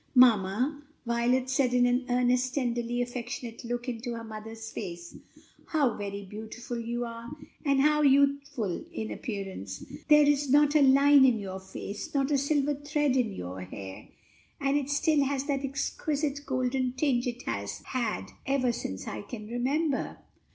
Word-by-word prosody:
"Mamma," 250 +4 +4 0.2
Violet 240 +2 +1
said 260 -1 +1
with 245 0 +5
an 245 +1 +2
earnest, 250 +1 +2
tenderly 240 -2 0
affectionate 245 -1 -6
look 240 +1 -3
into 240 0 -3
her 230 - -6
mother's 225 0 -8
face, 175 -4 -7 0.5
"how 285 -7 +2
very 200 -1 -5
beautiful 220 +4 -6
you 240 +1 -2
are! 230 0 -7 0.3
and 275 -3 +3
how 300 +1 +4
youthful 280 - +2
in 220 -10 -4
appearance! 195 - -5 0.2
there 300 -1 +7
is 290 -1 +2
not 290 +2 +5
a 300 - +6
line 280 +1 +7
in 250 -3 +5
your 190 -2 -5
face, 190 +5 -7
not 275 +1 +1
a 285 - +4
silver 285 +1 +1
thread 290 -1 0
in 245 -5 +2
your 90 +1 -6
hair, 95 +1 -8 0.5
and 275 0 +1
it 285 -1 0
still 285 +1 +3
has 275 -1 -1
that 280 -1 -1
exquisite 285 +1 -2
golden 255 -1 0
tinge 255 -2 +1
it 245 0 -4
has 100 -2 -4
had 240 -4 -2 0.2
ever 265 -2 +2
since 95 - -5
I 105 - -4
can 215 - -8
remember." 265 +5 -1
250 Hz, 160 wpm, -29 LUFS, 225-280 Hz, 0.5 s, there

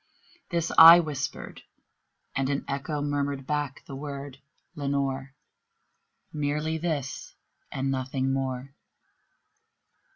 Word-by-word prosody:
This 170 -2 -1
I 165 +1 +12
whispered, 150 -5 -4 0.7
and 135 0 0
an 140 -1 -1
echo 140 +2 -3
murmured 140 -2 -2
back 145 -2 -3
the 135 - -8
word, 140 -1 -7 0.3
"Lenore!" 140 -2 -2 1.0
Merely 150 +2 -1
this 150 -5 -4 0.4
and 135 +1 -1
nothing 130 0 -1
more. 135 0 -3
140 Hz, 95 wpm, -27 LUFS, 135-150 Hz, 1.0 s, I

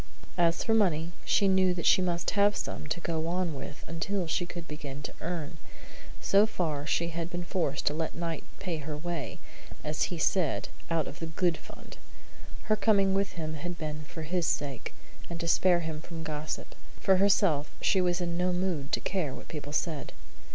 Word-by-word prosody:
As 170 -1 +3
for 225 - +2
money, 170 -7 +3
she 200 - +4
knew 190 -1 +4
that 170 - -3
she - - +6
must 175 -1 0
have 205 0 +4
some - - -4
to 155 - -1
go 165 -1 -1
on 175 -1 0
with 145 +2 -7
until 180 +3 -1
she 175 +2 0
could 175 -2 -7
begin 145 -2 -6
to - - -5
earn. 165 -2 -3 0.6
So 200 +2 +5
far 155 -8 -1
she 170 0 +1
had 165 0 -3
been 175 0 -3
forced 165 -6 -1
to - - +4
let 160 +1 -2
Knight 165 -1 -3
pay 175 -4 -2
her 150 0 -4
way, 170 -2 -3 0.5
as 150 0 +1
he 175 - -4
said, 165 -1 +2 0.2
out 165 -3 +1
of 145 - -8
the 165 - -3
"good" 170 +1 +2
fund. - - -12 0.7
Her 215 - +3
coming 200 -3 +4
with 195 0 +1
him 155 -3 -3
had 175 +3 -4
been 155 -1 -4
for 160 +2 -7
his 170 +1 0
sake, 140 -4 -2 0.3
and 170 -1 -4
to 170 - -2
spare 175 +1 +5
him 160 -1 -4
from 165 0 -7
gossip. 155 -1 -4 0.3
For 190 -1 +5
herself, 185 -6 +4
she 190 - +3
was 175 0 +2
in 170 -1 -1
no 180 +1 +2
mood 180 -6 -1
to - - +4
care 170 -9 -1
what - - -10
people 150 -2 -5
said. 155 -1 -1
170 Hz, 195 wpm, -30 LUFS, 155-180 Hz, 0.7 s, she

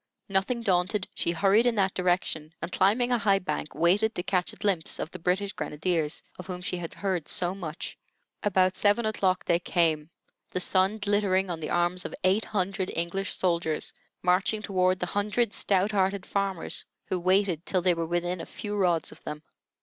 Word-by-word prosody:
Nothing 195 +5 +1
daunted, 185 -1 +1
she - - -1
hurried 200 +7 +4
in 240 - +2
that 195 -2 +2
direction 175 -3 -1
and, 170 - -5
climbing 225 +8 +3
a 245 - +3
high 200 -2 +4
bank, 180 -5 -4
waited 200 +7 +3
to 175 - -2
catch 180 -1 0
a - - -12
glimpse 195 -6 0
of 160 - -4
the 185 - -8
British 190 +4 0
grenadiers, 155 -3 -1 0.2
of 180 - -8
whom 180 -1 -4
she 180 0 -2
had 170 -2 -6
heard 185 -6 -2
so 175 0 0
much. 170 -5 -6 0.4
About 185 -3 +3
seven 210 +3 +3
o'clock 190 -4 +1
they 170 0 +3
came, 160 -3 +1 0.4
the 185 - -2
sun 190 +3 +2
glittering 200 -3 +1
on 165 - -3
the 155 - -4
arms 175 +1 +1
of - - -5
eight 190 +4 +3
hundred 195 -1 -1
English 170 +4 -1
soldiers 170 -4 0 0.3
marching 190 +4 +2
toward 185 -2 +2
the - - -2
hundred 210 +2 0
stout 195 +1 +2
hearted 195 -1 +1
farmers, 195 -4 -2 0.2
who 185 - -2
waited 185 -2 +2
till 185 -2 +1
they 180 -1 +4
were 165 -1 -2
within 175 +1 -1
a - - -6
few 210 -1 -5
rods 175 -5 +1
of - - -15
them. 150 0 -6
185 Hz, 190 wpm, -28 LUFS, 175-200 Hz, 0.4 s, hurried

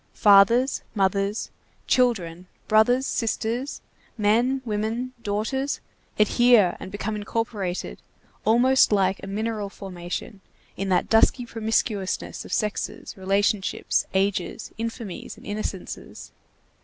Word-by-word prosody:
Fathers, 210 +6 +5
mothers, 200 +1 0 0.3
children, 185 -9 +1 0.2
brothers, 245 +5 +4
sisters, 235 +3 -2 0.4
men, 235 +5 +2
women, 225 +4 -2
daughters, 235 +7 -2 0.4
adhere 215 -3 +5
and 190 - -8
become 210 +2 -3
incorporated, 205 -3 -3 0.4
almost 245 +4 +4
like 195 -2 +2
a - - -7
mineral 210 0 -2
formation, 190 +2 -7 0.3
in 195 0 -3
that 185 - +2
dusky 235 +2 +4
promiscuousness 220 -3 -1
of - - -11
sexes, 210 -1 -2
relationships, 195 +1 0
ages, 195 +1 -1
infamies, 230 -4 -5
and - - -15
innocences. 205 -2 -6
215 Hz, 100 wpm, -25 LUFS, 195-230 Hz, 0.4 s, Fathers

